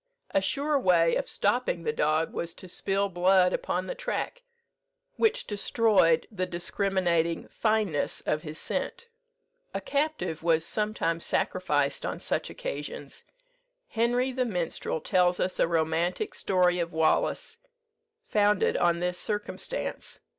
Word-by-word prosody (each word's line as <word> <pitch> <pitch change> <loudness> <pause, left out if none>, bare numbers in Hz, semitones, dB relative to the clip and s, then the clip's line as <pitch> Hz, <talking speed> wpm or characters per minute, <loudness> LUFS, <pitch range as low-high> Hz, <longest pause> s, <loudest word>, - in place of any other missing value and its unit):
A 195 - +2
sure 280 +8 +1
way 170 -6 +4
of - - -2
stopping 205 -5 0
the 150 - -1
dog 155 +2 +1
was 170 0 -3
to 185 - -10
spill 195 +2 0
blood 180 0 +3
upon - - -1
the - - -3
track, - - -3 0.8
which 450 - +2
destroyed 205 -5 +3
the 185 -3 -2
discriminating 175 -2 0
fineness 215 -9 0
of 150 - -1
his 155 0 -7
scent. 470 - -4 0.7
A - - 0
captive 290 - -1
was 165 -1 +2
sometimes 170 -4 -1
sacrificed 145 -6 0
on - - -3
such - - -2
occasions. - - -6 0.6
Henry 245 +3 +1
the 255 0 0
Minstrel 175 -7 -2
tells 180 +1 +2
us 185 - 0
a - - +4
romantic 165 +1 0
story 180 -1 +2
of 170 -1 -2
Wallace, 160 - +1 0.7
founded 210 -1 +3
on 170 0 +2
this 180 0 -1
circumstance. 210 - -4
185 Hz, 130 wpm, -28 LUFS, 165-215 Hz, 0.8 s, way